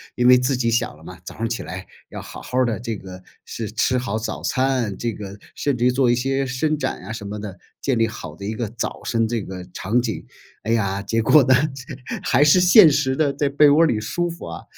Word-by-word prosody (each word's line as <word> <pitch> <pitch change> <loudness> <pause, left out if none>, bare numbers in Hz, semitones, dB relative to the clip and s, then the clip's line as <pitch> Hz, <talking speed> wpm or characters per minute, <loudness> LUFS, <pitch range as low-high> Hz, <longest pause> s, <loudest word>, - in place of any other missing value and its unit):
因 125 - +2
为 125 0 +8
自 125 +1 0
己 120 -2 0
想 120 +2 0
了 - - -18
嘛， 90 -2 -11
早 - - -9
上 115 - -3
儿 - - 0
起 115 +1 -4
来 95 0 -7 0.2
要 - - -7
好 - - -10
好 125 - -5
儿 130 - +4
的， 110 -3 -2
这 115 -2 -4
个 95 -1 -11 0.2
是 110 -3 -6
吃 125 +3 +1
好 115 -3 -2
早 110 - -4
餐， 130 -6 0
这 120 -1 -2
个 100 -1 -8 0.2
甚 140 -3 -1
至 120 - 0
于 125 - +4
做 125 -1 +2
一 120 - +3
些 135 +2 -1
伸 150 +5 -1
展 - - -3
啊 95 - -8
什 110 -2 -7
么 105 +1 -5
的， 100 -2 -8 0.2
建 130 -4 0
立 115 0 +2
好 115 - -8
的 100 - -9
一 110 - -3
个 115 -1 -3
早上 115 0 -2
这 115 -1 -2
个 95 -1 -7
场 115 +6 0
景。 115 -3 -4 0.4
哎 110 - -2
呀， 100 -4 0
结 115 +3 -1
果 145 +6 +6
呢， 130 - +4 0.7
还 130 +3 +3
是 150 +5 +6
现 180 0 +8
实 135 -2 +1
的， 145 -1 +1
在 145 - 0
被 145 +1 +5
窝 155 +3 +5
儿 - - +6
里 110 -8 0
舒 175 +10 -2
服 170 - -8
啊。 80 - -7
120 Hz, 275 characters per minute, -22 LUFS, 110-135 Hz, 0.7 s, 为